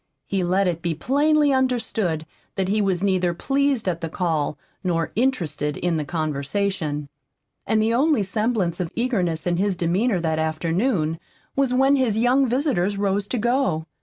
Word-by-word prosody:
He 190 Hz, +7 st, -1 dB
let 185 Hz, +2 st, +2 dB
it 170 Hz, -2 st, -1 dB
be 170 Hz, -2 st, -1 dB
plainly 290 Hz, -, +2 dB
understood 225 Hz, -11 st, 0 dB, 0.3 s
that 190 Hz, -1 st, -1 dB
he 210 Hz, +2 st, +2 dB
was 190 Hz, -2 st, 0 dB
neither 185 Hz, -3 st, +1 dB
pleased 275 Hz, +1 st, 0 dB
at 170 Hz, -2 st, -1 dB
the 165 Hz, -, -3 dB
call 155 Hz, -4 st, -1 dB, 0.3 s
nor 165 Hz, -3 st, 0 dB
interested 165 Hz, -, 0 dB
in 175 Hz, -2 st, 0 dB
the 155 Hz, -, -1 dB
conversation. 155 Hz, +1 st, -2 dB, 0.6 s
And 220 Hz, +1 st, +2 dB
the 220 Hz, +1 st, +2 dB
only 275 Hz, -2 st, +3 dB
semblance 195 Hz, -3 st, -1 dB
of 175 Hz, -3 st, -3 dB
eagerness 185 Hz, -10 st, -1 dB
in 175 Hz, -1 st, +1 dB
his 195 Hz, +1 st, +1 dB
demeanor 185 Hz, +5 st, +1 dB
that 160 Hz, -1 st, -1 dB
afternoon 165 Hz, +2 st, 0 dB, 0.4 s
was 275 Hz, -2 st, +2 dB
when 270 Hz, +2 st, +4 dB
his 240 Hz, -5 st, +1 dB
young 255 Hz, +4 st, +3 dB
visitors 235 Hz, -, 0 dB
rose 200 Hz, 0 st, 0 dB
to 250 Hz, -, -2 dB
go. 235 Hz, -, +1 dB
195 Hz, 165 wpm, -23 LUFS, 165-245 Hz, 0.6 s, when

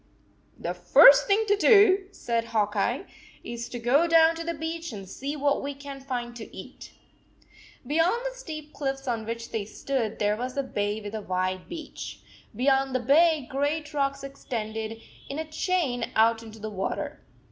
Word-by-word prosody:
"The -, -, -3 dB
first -, -, +7 dB
thing 420 Hz, +2 st, +3 dB
to 410 Hz, -1 st, +3 dB
do," 400 Hz, -2 st, +5 dB
said 235 Hz, -11 st, -2 dB
Hawk 215 Hz, -2 st, 0 dB
Eye, 240 Hz, -, 0 dB, 0.4 s
"is 235 Hz, 0 st, -6 dB
to 245 Hz, -, -5 dB
go 260 Hz, +8 st, +3 dB
down 330 Hz, 0 st, +6 dB
to 330 Hz, 0 st, -5 dB
the 335 Hz, 0 st, -3 dB
beach 325 Hz, +1 st, -4 dB
and 195 Hz, -3 st, -8 dB
see 275 Hz, +9 st, -5 dB
what 285 Hz, -1 st, +1 dB
we 280 Hz, 0 st, -4 dB
can 280 Hz, -1 st, -9 dB
find 245 Hz, -3 st, -4 dB
to 225 Hz, -, -10 dB
eat." -, -, -11 dB, 0.9 s
Beyond 335 Hz, -, +1 dB
the -, -, -3 dB
steep 310 Hz, -10 st, -8 dB
cliffs 270 Hz, -1 st, -3 dB
on 225 Hz, -3 st, -2 dB
which 230 Hz, 0 st, -5 dB
they 225 Hz, -3 st, -2 dB
stood 225 Hz, +1 st, -3 dB
there 210 Hz, 0 st, +1 dB
was 250 Hz, +4 st, -5 dB
a 275 Hz, -, +1 dB
bay 205 Hz, -4 st, -2 dB
with 205 Hz, 0 st, -7 dB
a 220 Hz, -, -3 dB
wide 185 Hz, -1 st, -2 dB
beach. 335 Hz, -2 st, -7 dB, 0.3 s
Beyond 270 Hz, +2 st, +2 dB
the -, -, +3 dB
bay 295 Hz, +2 st, +4 dB
great 290 Hz, +3 st, -2 dB
rocks 275 Hz, -1 st, -1 dB
extended 225 Hz, -5 st, -5 dB, 0.3 s
in 275 Hz, -, -4 dB
a 320 Hz, -, -3 dB
chain 310 Hz, -5 st, -1 dB
out 225 Hz, +1 st, +4 dB
into 220 Hz, -1 st, -11 dB
the 215 Hz, 0 st, -6 dB
water. 195 Hz, -1 st, -4 dB
270 Hz, 180 wpm, -27 LUFS, 225-320 Hz, 0.9 s, first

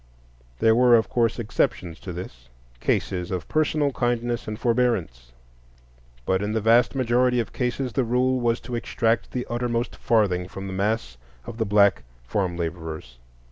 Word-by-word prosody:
There 110 Hz, -, +4 dB
were, 120 Hz, +1 st, +6 dB
of 110 Hz, -, +2 dB
course, 115 Hz, -2 st, +1 dB
exceptions 90 Hz, -7 st, -1 dB
to 95 Hz, -, -7 dB
this,—cases -, -, -4 dB
of 90 Hz, -3 st, -4 dB
personal 155 Hz, -2 st, +1 dB
kindness 120 Hz, -1 st, -1 dB
and 110 Hz, 0 st, -4 dB
forbearance; 115 Hz, -, 0 dB, 0.9 s
but 95 Hz, 0 st, +1 dB
in 105 Hz, +1 st, -2 dB
the 110 Hz, -, +1 dB
vast 115 Hz, +4 st, +4 dB
majority 125 Hz, -1 st, +2 dB
of 115 Hz, -, -3 dB
cases 125 Hz, 0 st, -2 dB
the 135 Hz, -, +1 dB
rule 125 Hz, +2 st, +1 dB
was 120 Hz, -1 st, +1 dB
to 125 Hz, -, -8 dB
extract 115 Hz, -1 st, 0 dB
the 125 Hz, -1 st, -3 dB
uttermost 120 Hz, 0 st, -2 dB
farthing 95 Hz, -6 st, +1 dB
from 95 Hz, +1 st, -8 dB
the 95 Hz, -, -5 dB
mass 100 Hz, -, -1 dB, 0.3 s
of 115 Hz, -, -8 dB
the 110 Hz, -, +1 dB
black 100 Hz, 0 st, +4 dB, 0.2 s
farm 90 Hz, +6 st, -2 dB
laborers. 80 Hz, -7 st, -5 dB
115 Hz, 155 wpm, -24 LUFS, 90-120 Hz, 0.9 s, were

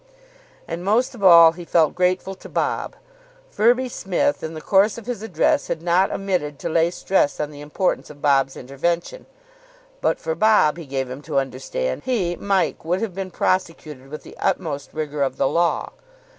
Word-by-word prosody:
And, 170 Hz, +1 st, -5 dB
most 220 Hz, +8 st, +1 dB
of 225 Hz, -5 st, -9 dB
all, 170 Hz, -3 st, +9 dB
he 175 Hz, +1 st, -10 dB
felt 165 Hz, -2 st, +2 dB
grateful 185 Hz, +1 st, 0 dB
to 190 Hz, -, -13 dB
Bob. -, -, -2 dB, 0.6 s
Firby 245 Hz, +4 st, +3 dB
Smith, 240 Hz, +5 st, -1 dB
in 160 Hz, 0 st, -6 dB
the -, -, -5 dB
course 200 Hz, +6 st, +3 dB
of 230 Hz, -, -9 dB
his 245 Hz, -4 st, -4 dB
address, 190 Hz, -8 st, +1 dB
had 165 Hz, -1 st, -4 dB
not 180 Hz, +2 st, +3 dB
omitted 180 Hz, -7 st, -2 dB
to -, -, -4 dB
lay 165 Hz, +1 st, +2 dB
stress 180 Hz, -4 st, 0 dB
on 150 Hz, 0 st, -2 dB
the 145 Hz, -1 st, -11 dB
importance 150 Hz, +5 st, -2 dB
of 150 Hz, -1 st, -12 dB
Bob's 135 Hz, -2 st, +2 dB
intervention. 170 Hz, -, -3 dB, 0.7 s
But -, -, +1 dB
for 160 Hz, -, -3 dB
Bob, 190 Hz, -4 st, +3 dB
he 165 Hz, -4 st, -9 dB
gave 135 Hz, -1 st, -2 dB
him 130 Hz, +3 st, -8 dB
to 140 Hz, -, -3 dB
understand, 135 Hz, -, -2 dB
he, 200 Hz, -9 st, -1 dB
Mike, 195 Hz, 0 st, 0 dB
would 175 Hz, +3 st, 0 dB
have 225 Hz, -5 st, -3 dB
been 190 Hz, 0 st, -5 dB
prosecuted 160 Hz, -8 st, -2 dB
with 155 Hz, +1 st, -8 dB
the -, -, -13 dB
utmost 145 Hz, -3 st, -2 dB
rigour 150 Hz, -2 st, -4 dB
of 135 Hz, -2 st, 0 dB
the -, -, +2 dB
law. 170 Hz, +4 st, 0 dB
170 Hz, 185 wpm, -22 LUFS, 150-195 Hz, 0.7 s, all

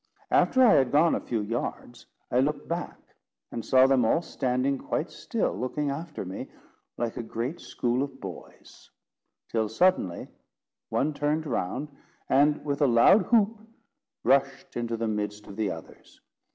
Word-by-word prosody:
After 260 Hz, -1 st, +4 dB
I 225 Hz, -, +7 dB
had 130 Hz, -2 st, +3 dB
gone 160 Hz, +3 st, +4 dB
a -, -, +1 dB
few 115 Hz, -3 st, -2 dB
yards, 120 Hz, +2 st, -5 dB, 0.2 s
I 125 Hz, -, +3 dB
looked 145 Hz, +2 st, 0 dB
back, 170 Hz, +1 st, -4 dB, 0.5 s
and 115 Hz, -, -4 dB
saw 130 Hz, +3 st, +5 dB
them 135 Hz, -2 st, +4 dB
all 140 Hz, +9 st, +2 dB
standing 130 Hz, -2 st, -1 dB
quite -, -, -3 dB
still, -, -, -2 dB
looking 140 Hz, +3 st, -2 dB
after 150 Hz, -, -5 dB
me, 95 Hz, +1 st, -6 dB, 0.5 s
like 120 Hz, -2 st, -3 dB
a -, -, -2 dB
great 120 Hz, +7 st, -4 dB
school 120 Hz, +1 st, -1 dB
of 140 Hz, -1 st, -4 dB
boys; 95 Hz, -4 st, -11 dB, 0.6 s
till 110 Hz, -2 st, -1 dB
suddenly 110 Hz, -, +1 dB, 0.6 s
one 150 Hz, +3 st, 0 dB
turned 150 Hz, +2 st, -1 dB
round, 130 Hz, +2 st, -2 dB, 0.4 s
and 145 Hz, +3 st, +3 dB
with 140 Hz, 0 st, -2 dB
a 145 Hz, -, +5 dB
loud 175 Hz, -, +5 dB
whoop, 225 Hz, -1 st, +3 dB, 0.6 s
rushed 135 Hz, 0 st, +1 dB
into 115 Hz, -1 st, -2 dB
the 115 Hz, 0 st, -1 dB
midst 105 Hz, -1 st, -3 dB
of 100 Hz, -, -10 dB
the 110 Hz, -2 st, -1 dB
others. 80 Hz, -, -10 dB
130 Hz, 155 wpm, -27 LUFS, 115-150 Hz, 0.6 s, I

